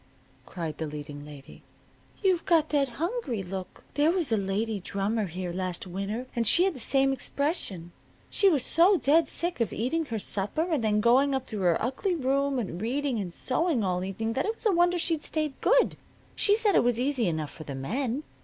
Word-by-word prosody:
cried 165 -4 -5
the 160 - -2
leading 145 -1 -7
lady. 145 -2 -12 0.6
"You've 370 -3 +3
got 330 -5 +3
that 280 -3 +2
hungry 330 - -2
look. 185 0 -7
There 295 +2 +3
was 340 -7 0
a - - +4
lady 205 +2 -1
drummer 200 +3 -1
here 180 +1 -5
last 185 -1 -3
winter, 200 +6 -4
and 230 -2 +1
she 345 - +5
had 385 -1 +2
the 265 - -9
same 270 +3 +2
expression. 265 - -3 0.4
She 400 - +3
was 285 -8 +1
so 360 +4 +5
dead 320 +2 +3
sick 345 -7 -2
of 230 - +1
eating 290 +9 -1
her 230 -6 -3
supper 205 +8 -2
and 310 -9 0
then 210 -1 +2
going 265 +5 +4
up 265 -1 -2
to 215 -3 -5
her 175 -2 +3
ugly 270 - -1
room 275 -1 +1
and 190 -6 -3
reading 260 +1 -1
and 185 -4 -4
sewing 260 - 0
all 180 -1 0
evening 220 +4 -3
that 265 - -1
it 445 - -1
was - - -14
a 430 - +5
wonder 350 0 +3
she'd 330 -2 0
stayed 305 -2 -2
good. - - +3 0.4
She 410 - +4
said 430 -2 +2
it - - +5
was 240 -1 +1
easy 255 -4 +1
enough 155 -3 -2
for 155 - -10
the 140 - -6
men. 245 - -2
245 Hz, 205 wpm, -28 LUFS, 195-315 Hz, 0.6 s, she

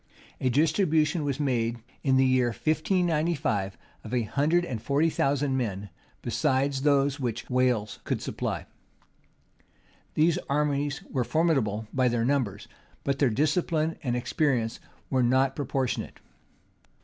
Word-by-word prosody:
[*] - - -26
A 130 - +2
distribution 155 - +2
was 140 -1 -2
made, 120 -5 0 0.2
in 135 -2 +3
the 130 - +5
year 130 -1 +3
1595, 155 - 0 0.3
of 115 +3 -4
a 120 - +2
hundred 150 +10 +1
and 115 -9 -4
forty 145 +7 +2
thousand 140 -1 +1
men, 105 -5 -3 0.3
besides 135 +1 +1
those 140 0 +2
which 120 -4 -3
Wales 125 -5 +1
could - - -1
supply.[] - - -3 1.5
These 160 +2 +3
armies 145 -1 0
were 130 - -1
formidable 120 -9 +1
by 130 -1 +3
their 115 -1 +1
numbers; 120 -7 -1 0.4
but 140 -1 -1
their 140 - +4
discipline 155 +5 +1
and 125 -4 -1
experience 125 -3 0 0.3
were 130 -1 +3
not 130 +2 +3
proportionate. 135 -2 -2
135 Hz, 130 wpm, -27 LUFS, 120-150 Hz, 1.5 s, the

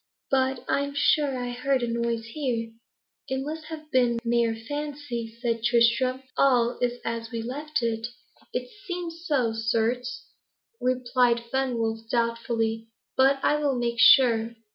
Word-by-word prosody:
But 265 -1 +1
I - - +2
am 280 0 -3
sure 285 -1 +2
I 245 0 -3
heard 255 +1 0
a - - 0
noise 235 -1 -1
here." 230 -2 -3 0.6
"It 265 0 -2
must 310 +2 -5
have 310 -1 -9
been 245 -3 +3
mere 235 -1 +2
fancy," 250 -2 -5
said 230 -2 -1
Tristram. 240 +2 +3
"All 245 -3 +3
is 245 0 -1
as 230 0 -3
we 230 -2 -4
left 295 +3 -3
it." 225 0 -1 0.4
"It 250 0 -3 0.2
seems 345 -2 -5
so, 255 -7 +1
certes," 230 - -1 0.5
replied 250 -1 +2
Fenwolf 230 -4 -1
doubtfully. 230 -1 -1 0.3
"But 270 +1 +4
I 295 - +3
will 290 -3 0
make 235 -1 -1
sure." 240 -4 +6
245 Hz, 140 wpm, -26 LUFS, 230-275 Hz, 0.6 s, sure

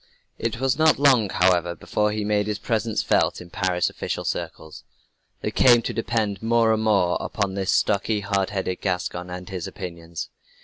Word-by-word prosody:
It 115 +1 -2
was 135 +2 0
not 160 0 +5
long, 130 -7 +4
however, 90 -2 +2
before 105 +3 -1
he 105 -1 -2
made 105 0 +1
his 105 -1 -1
presence 110 0 -1
felt - - +2
in 85 -1 -12
Paris 90 -1 0
official - - -4
circles. 80 -1 -5 0.6
They - - -2
came 120 -2 +5
to - - -3
depend 110 -4 -1
more 115 0 +3
and 110 - 0
more 100 -5 +2
upon 100 -3 -2
this 95 -1 -1
stocky, 105 +1 +1
hard 100 -1 0
headed 95 -2 -3
Gascon 90 -1 -2
and 90 0 -7
his 90 -3 -5
opinions. 85 -2 -7
100 Hz, 175 wpm, -24 LUFS, 90-110 Hz, 0.6 s, not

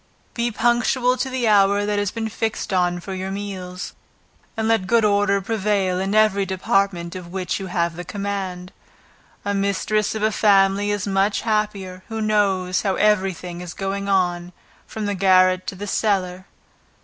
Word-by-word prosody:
Be 235 0 0
punctual 240 +2 +2
to 265 +2 -2
the 255 -2 -1
hour 200 -1 +4
that 205 0 0
has 205 -1 0
been 225 +1 -4
fixed 220 -1 -3
on 175 -1 +1
for 190 +2 -6
your 190 0 -4
meals, 190 -2 -6 0.6
and 220 0 0
let 225 -5 +1
good 230 0 +3
order 200 -1 +3
prevail 195 -3 0
in 195 +2 -1
every 215 -2 +4
department 190 -2 0
of 180 -2 -7
which 185 +1 -2
you 190 - -5
have 170 -2 -1
the 175 - -6
command. 190 -2 -4 0.7
A 205 - 0
mistress 200 +2 0
of 215 - -3
a 215 - +3
family 200 -1 +3
is 205 -2 -1
much 200 +1 +1
happier, 210 -4 -2
who 225 -1 -5
knows 195 -4 +1
how 195 -3 0
every 210 -2 +3
thing 175 0 -8
is 180 -1 -8
going 200 +1 -3
on 180 -2 0 0.3
from 220 -1 -5
the 205 - -1
garret 185 -1 +3
to - - -4
the 200 +2 -6
cellar. 190 -3 -1
200 Hz, 175 wpm, -22 LUFS, 185-210 Hz, 0.7 s, hour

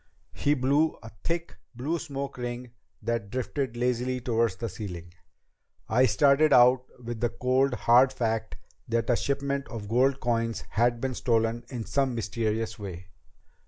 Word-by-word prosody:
He 145 +1 +1
blew 145 +4 +2
a 110 - -10
thick, 170 0 -3 0.2
blue 150 +8 -2
smoke 140 -4 -5
ring 120 0 -5 0.3
that 115 -2 -2
drifted 130 +1 -3
lazily 125 +1 0
toward 115 -3 +1
the 115 +5 -5
ceiling. 90 -5 -7 0.7
"I 125 +4 +4
started 145 +5 +4
out 125 +1 +6 0.2
with 120 -1 -4
the 120 - +1
cold, 130 +2 +1
hard 125 +3 +5
fact 115 -3 -2 0.3
that 115 +1 0
a - - +4
shipment 140 +1 -1
of 110 -4 -7
gold 130 +5 +2
coins 115 -2 -1
had 120 +1 +2
been 130 -1 -1
stolen 115 -1 0
in 120 -4 -5
some 135 -3 0
mysterious 110 0 -2
way. 90 -3 -8
120 Hz, 150 wpm, -27 LUFS, 115-135 Hz, 0.7 s, out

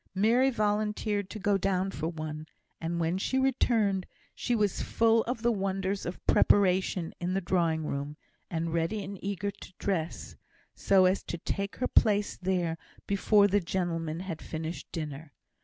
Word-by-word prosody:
Mary 235 +7 +4
volunteered 210 -3 0
to - - -6
go 200 -1 +1
down 190 0 0
for 160 - -3
one; 155 -2 -5 0.3
and 170 +1 -2
when 170 +3 0
she 260 - 0
returned 230 -7 +2 0.3
she 245 - -1
was 210 -4 +1
full 225 0 +3
of 240 -1 -3
the 240 - +4
wonders 195 -1 -1
of 175 - -7
preparation 185 -3 +3
in 180 +1 -1
the - - +2
drawing 170 -4 +1
room, 145 +1 -4 0.3
and 165 -1 -2
ready 170 +6 0
and 195 0 -8
eager 200 0 -2
to - - -13
dress, 170 -5 -3 0.4
so 190 -2 +4
as 185 +1 +3
to 170 - -5
take 200 +4 -3
her 255 - -1
place 205 -1 +3
there 180 -3 -1 0.3
before 200 +1 +4
the 205 +1 +3
gentlemen 165 -3 -2
had 185 -4 -5
finished 160 +1 -6
dinner. 150 -2 -6
190 Hz, 160 wpm, -29 LUFS, 165-205 Hz, 0.4 s, Mary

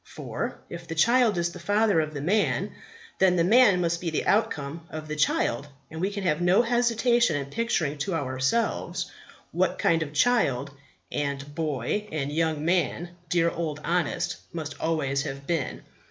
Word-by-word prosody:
For, - - -4
if 170 0 -8
the 165 - -5
child 235 +3 +4
is 170 0 0
the - - -10
father 205 +1 +2
of 155 -1 -5
the 145 - -3
man, 205 +6 +1 0.5
then 190 -1 +5
the 170 - +3
man 205 -1 +5
must 170 -1 0
be 175 - -1
the 155 - -2
outcome 165 -7 0
of 155 0 -7
the 155 - -4
child, 145 -3 +1 0.2
and 160 +1 -6
we 190 - +1
can 200 -1 -5
have 165 -2 +1
no 180 +6 +4
hesitation 235 - +2
in 140 -1 -4
picturing 170 -11 -1
to 185 +4 -1
ourselves 130 - -1 0.4
what - - +1
kind 165 -1 +2
of 150 -2 -3
child 145 - +2 0.4
and 140 0 -3
boy 155 - -2
and 145 -2 -2
young 155 -1 0
man 175 0 0 0.2
dear 170 -1 +2
Old 155 -3 -3
Honest 175 0 -1
must 160 -3 -6
always 145 -4 0
have 140 0 -6
been. 160 -3 -2
165 Hz, 170 wpm, -26 LUFS, 145-195 Hz, 0.5 s, then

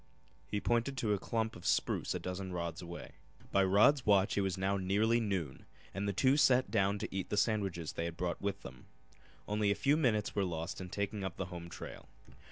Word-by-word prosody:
He 105 - -1
pointed 120 +5 0
to 110 -4 +1
a 100 - 0
clump 110 +2 -2
of 90 - -11
spruce - - +1
a - - -2
dozen 90 +1 -5
rods 85 -1 -3
away. 85 0 -8 0.4
By 100 - +4
Rod's 105 +9 +5
watch 100 -2 +3
it 100 - +2
was 95 -2 -1
now 95 +1 +1
nearly 105 +5 +2
noon 95 - -3 0.3
and 100 +1 -2
the - - +1
two 130 +8 +3
sat 130 -3 +4
down 100 -2 +2
to 100 - -5
eat 95 - -2
the 105 - -1
sandwiches 100 -7 0
they 85 - -2
had 85 -1 -5
brought 90 -1 -2
with 100 -1 -3
them. - - -11 0.6
Only 105 0 +1
a 100 - +3
few 140 +6 +3
minutes 115 -9 +1
were 100 - +1
lost 85 +1 -3
in 90 - -6
taking 100 +1 -3
up 95 -3 -4
the 95 - -2
home 85 -1 -7
trail. 90 - -9
100 Hz, 215 wpm, -34 LUFS, 90-110 Hz, 0.6 s, Rod's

